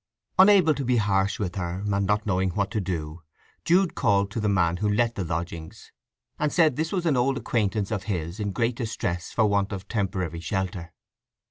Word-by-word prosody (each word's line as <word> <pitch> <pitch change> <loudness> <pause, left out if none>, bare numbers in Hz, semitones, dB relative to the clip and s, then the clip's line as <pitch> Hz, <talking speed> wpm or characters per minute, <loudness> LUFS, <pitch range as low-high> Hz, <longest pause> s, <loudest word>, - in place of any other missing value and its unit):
Unable 190 -5 +7
to 140 - -4
be 125 -1 +2
harsh 100 -2 +1
with 90 -4 -3
her, 90 +1 -3
and 100 -1 0
not 105 +1 +1
knowing 95 -2 +1
what 100 -2 0
to 110 - -1
do, 85 -3 -4 0.4
Jude 180 +1 +3
called 100 0 +1
the 105 -2 -1
man 90 -3 +2
who 105 +2 0
let 115 +2 +2
the 100 - -3
lodgings, 85 -1 -6 0.5
and 150 -1 +1
said 160 -6 +3
this 160 +3 -2
was 180 -3 -1
an 155 -4 +3
acquaintance 115 -5 0
of 105 -4 -2
his 85 -2 -3
in 105 -1 -2
great 115 +3 0
distress 95 -7 -3
for 110 - +2
want 100 -1 +1
of 100 -2 -6
temporary 95 -6 -2
shelter. 90 0 -3
100 Hz, 190 wpm, -25 LUFS, 90-120 Hz, 0.5 s, Unable